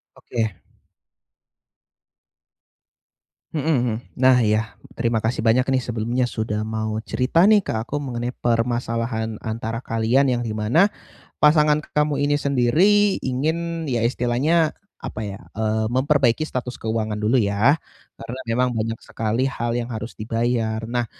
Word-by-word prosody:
Oke. 110 -6 -3 2.9
Hmm, 155 -2 -2
hmm, 125 -8 +1 0.2
nah 130 0 +5
iya, 110 +1 0 0.2
terima 115 -1 0
kasih 115 +1 0
banyak 115 +3 +3
nih 130 - +2
sebelumnya 120 +2 -1
sudah 105 -1 -2
mau 110 0 -3
cerita 165 - +2
nih 210 -3 +5
ke - - -2
aku 140 +5 -4
mengenai 125 -4 -3
permasalahan 115 -2 -1
antara 115 +1 -4
kalian, 115 +5 +2
yang 120 -1 0
di 110 - -3
mana 110 - +3 0.5
pasangan 150 0 +5 0.2
kamu 150 -1 +1
ini 145 0 +1
sendiri 175 +11 +3
ingin, 160 +5 -2
ya 120 -6 -1
istilahnya 130 +7 +1 0.2
apa 110 - -6
ya, 100 -2 -5 0.2
eee, 110 0 0
memperbaiki 135 -1 +2
status 125 -5 -3
keuangan 110 -1 -2
dulu 115 +5 +3
ya, 105 +7 +3 0.4
karena 115 +3 -7
memang 125 +1 +1
banyak 115 0 -2
sekali 115 +4 -1
hal 120 -3 -2
yang 120 0 -4
harus 110 +1 -6
dibayar. 115 0 -1
Nah, 120 0 0
120 Hz, 135 wpm, -22 LUFS, 110-135 Hz, 2.9 s, nah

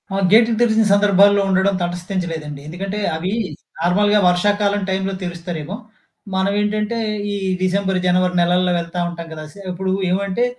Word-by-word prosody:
ఆ! - - 0
గేట్లు 225 +2 +6
తెరిసిన 225 -2 +4
సందర్భాల్లో 200 0 +5
ఉండడం 190 +1 +2
తటస్థించలేదండి. 175 -4 -4
ఎందుకంటే 195 +5 -4 0.2
అవీ 175 +4 -3 0.5
నార్మల్‌గా 205 +5 +3
వర్షాకాలం 205 +3 +1
టైంలో 190 +1 -1
తెరుస్తారేమో 175 0 -5 0.6
మనం 190 +1 +1
ఏంటంటే 210 +2 -1 0.4
ఈ - - -2 0.3
డిసెంబర్, 190 0 +1
జనవరి 180 0 +2
నెలల్లో 180 +1 +2
వెళ్తా 170 +1 -5
ఉంటాం 170 -1 -7
కదా! 155 -1 -7
సే - - -14
ఇప్పుడు 190 +1 -3 0.2
ఏవంటే, 200 +5 0
190 Hz, 135 wpm, -19 LUFS, 175-205 Hz, 0.6 s, గేట్లు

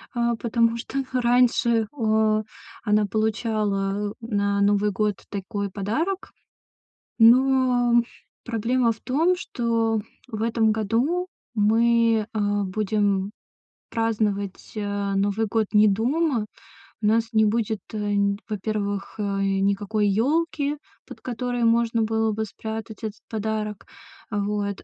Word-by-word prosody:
Э, 235 0 +1
потому 230 0 +2
что 270 +3 -3
раньше, 235 -2 +3
о 220 -3 +2 0.4
она 210 0 +3
получала 210 -2 -1
на 200 -3 0
Новый 205 +1 +3
год 210 0 -1
такой 200 0 -4
подарок. 305 - -2 0.9
Но 245 0 +5 0.4
проблема 235 +1 +1
в 225 - -7
том, 325 +8 +2
что 230 - 0 0.3
в 220 -3 -5
этом 225 -1 +2
году 240 - 0 0.3
мы, 225 +1 +3
э, 220 - -1 0.3
будем 200 0 0 0.6
праздновать, 210 -4 -1
э, 205 -1 -2
Новый 205 +3 +1
год 220 0 0
не 210 0 +6
дома. 245 +3 +1 0.6
У - - -2
нас 225 +1 +2
не 220 -1 +4
будет, 220 -1 0
нь 205 -1 +1
во-первых, 205 -1 -3
э, - - 0 0.2
никакой 200 +2 +1
ёлки, 290 +6 +1 0.3
под - - -11
которой 245 -1 -2
можно 230 0 +2
было 220 0 +1
бы 220 +1 -2
спрятать 220 +2 -7
этот 215 -1 -5
подарок. 215 -2 -3 0.5
Вот. 205 -1 -2
220 Hz, 115 wpm, -24 LUFS, 205-235 Hz, 0.9 s, не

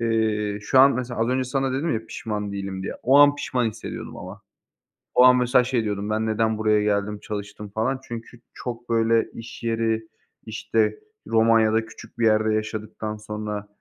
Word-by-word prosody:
Eee, 110 -3 0
şu 130 +5 +2
an 140 +1 +7
mesela 120 -2 -3
az 115 - +2
önce 130 0 +1
sana 135 0 -1
dedim 150 +5 -1
ya 110 0 -4
"Pişman 105 -2 -4
değilim." 95 -1 -4
diye. - - -4
O 135 +3 +5
an 145 0 +7
pişman 125 -4 -1
hissediyordum 110 0 -6
ama. - - -9 0.8
O 125 - +7
an 125 0 +7
mesela 125 +1 +4
şey 125 -2 0
diyordum: 105 0 -3
"Ben 110 +1 0
neden 110 0 +1
buraya 105 -1 +2
geldim, 105 0 0
çalıştım?" 105 0 -7
falan 115 +6 -1
çünkü 120 0 -8
çok, 120 -1 -7
böyle, 115 0 +2
iş 115 +1 -10
yeri, 115 -1 0 0.4
işte, 110 0 0 0.3
Romanya'da 110 0 +3
küçük 120 - -14
bir 115 - +3
yerde 110 0 +3
yaşadıktan 110 0 -4
sonra, 105 -1 -5
110 Hz, 175 wpm, -24 LUFS, 105-120 Hz, 0.8 s, an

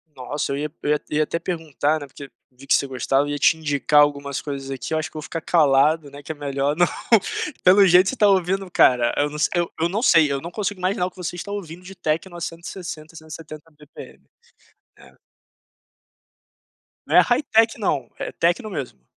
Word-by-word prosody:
Nossa 140 +3 -4
eu 140 - -2
ia 150 0 -4
eu 145 - 0
ia 150 - +1
ia 155 0 +1
até 165 +2 -3
perguntar, 160 -3 -2
né, - - -6
porque 140 0 -11 0.2
vi 135 +2 -16
que - - +3
você - - +1
gostava 135 +2 0
ia 145 - -2
te 160 - +4
indicar 150 -1 +2
algumas 140 -1 0
coisas 140 -2 -6
aqui 135 +3 -5
eu 160 - +1
acho 155 - -4
que - - -31
vou 155 - -6
ficar 165 +2 -5
calado, 150 -1 +2
né, 145 +1 -11
que 150 - -7
é - - -6
melhor, 140 0 -2
não, 175 +2 +4 0.8
pelo 195 +2 +6
jeito 180 +2 +5
você 265 - -3
tá 210 - +4
ouvindo 190 0 +1
cara, 125 -7 +3
eu 145 +1 +1
não 150 - -8 0.2
eu 175 -1 0
eu 170 - +1
não 210 +5 -2
sei, 155 - +5
eu 140 - -1
não 170 +3 -7
consigo 205 -2 -3
imaginar 185 +1 0
o - - -3
que - - -29
você 175 -1 -5
está 200 +3 -7
ouvindo 180 -3 -7
de 195 +1 -11
techno 165 +2 -3
a 170 - -8
160, 165 -2 -7
170 155 0 -11
bpm, 150 0 -14 0.8
é. - - -18 1.9
Não - - -1
é - - +10
high 245 +3 +1
tech, 225 -3 +2
não? 140 - -1
É - - -5
techno 175 +7 0
mesmo? 135 - -7
155 Hz, 210 wpm, -22 LUFS, 145-180 Hz, 1.9 s, é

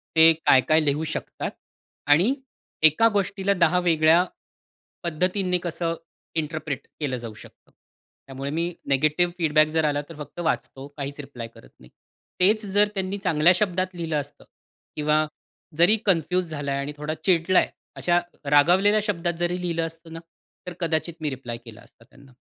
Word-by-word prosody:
ते 160 0 +8
काय-काय 155 +4 +5
लिहू 145 +2 0
शकतात? 155 -1 -4 0.6
आणि 170 - +5 0.5
एका 155 +9 +6
गोष्टीला 200 0 0
10 180 -1 +3
वेगळ्या, 165 0 +4 0.8
पद्धतीने 180 +2 0
कसं 170 -1 -2 0.4
इंटरप्रेट 155 -2 -3
केलं 135 -4 -2
जाऊ 115 -2 -7
शकतं? 105 - -17 0.6
त्यामुळे 135 +1 -5
मी 170 +3 -2
नेगेटिव्ह 155 +6 +2
फीडबॅक 155 -2 +3
जर 160 0 0
आला 145 -1 +1
तर 165 - -9
फक्त 150 +3 -9
वाचतो 140 -4 -2
काहीच 140 0 -5
रिप्लाय 135 -5 -7
करत 60 - -17
नाही. 60 - -17 0.5
तेच 210 +4 +3
जर 205 +1 +3
त्यांनी 190 +1 -2
चांगल्या 175 -3 +3
शब्दात 185 -2 -1
लिहिलं 165 -2 -3
असतं 145 0 -9 0.5
किंवा 150 +1 +2 0.5
जरी 180 +7 +5
कन्फ्युज 180 -1 +1
झालाय 140 -2 -3
आणि 140 +2 -4
थोडा 150 +1 -3
चिडलाय 180 0 +3 0.3
अशा 175 0 +2 0.3
रागावलेल्या 180 +9 +4
शब्दात 175 -5 -1
जरी 175 +1 -1
लिहिलं 170 -2 -1
असतं 165 0 -12
ना, 165 - -6 0.5
तर 180 - -5
कदाचित 165 0 -1
मी 155 - -1
रिप्लाय 125 -3 -6
केला 115 -1 -12
असता - - -21
त्यांना. 140 -1 -19
165 Hz, 150 wpm, -24 LUFS, 145-180 Hz, 0.8 s, ते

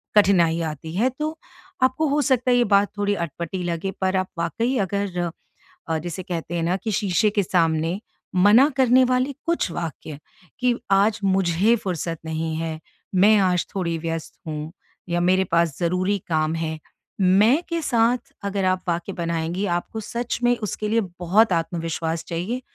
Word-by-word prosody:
कठिनाई 180 -5 +4
आती 160 0 -5
है। 235 +7 +2
तो 310 +1 -2 0.5
आपको 260 +5 +2
हो 290 +2 +2
सकता 255 -2 +2
है 245 - +4
ये 245 - +4
बात 200 -2 +3
थोड़ी 205 0 +1
अटपटी 170 +1 -4
लगे 175 +2 -2
पर 190 0 +1
आप 185 0 0
वाक़ई 230 - 0
अगर 190 -3 -1 0.7
जिसे 175 +2 -5
कहते 170 -1 -4
हैं 170 - -1
ना 175 +2 +1
कि 215 +3 -4
शीशे 205 +1 +2
के 205 -1 +1
सामने 165 0 +1 0.4
मना 205 +9 +6
करने 255 0 +5
वाले 255 +2 +1
कुछ 335 - 0
वाक्य 160 -3 -5 0.4
कि 250 -1 +2 0.2
आज 205 +3 +3
मुझे 190 +3 +3
फ़ुर्सत 175 -6 -3
नहीं 160 0 -2
है, 160 -1 -3 0.4
मैं 205 +4 +6
आज 180 -3 +2
थोड़ी 170 -3 -1
व्यस्त 165 0 -4
हूँ 155 0 -5 0.4
या 175 0 +1
मेरे 185 +2 +3
पास 170 -4 +2
ज़रूरी 185 +4 +1
काम 155 -1 0
है। 160 -1 -3 0.4
मैं 205 - +5
के 335 -1 -1
साथ 240 -3 +1
अगर 200 -1 -1
आप 185 0 +1
वाक्य 170 +3 -2
बनाएँगी 170 +2 -2
आपको 220 +5 -6
सच 235 +3 -3
में 245 0 +4
उसके 210 0 -4
लिए 225 +1 +2 0.2
बहुत 190 +4 +3
आत्मविश्वास 165 -1 -2
चाहिए 185 +10 -3
185 Hz, 165 wpm, -23 LUFS, 165-220 Hz, 0.7 s, मना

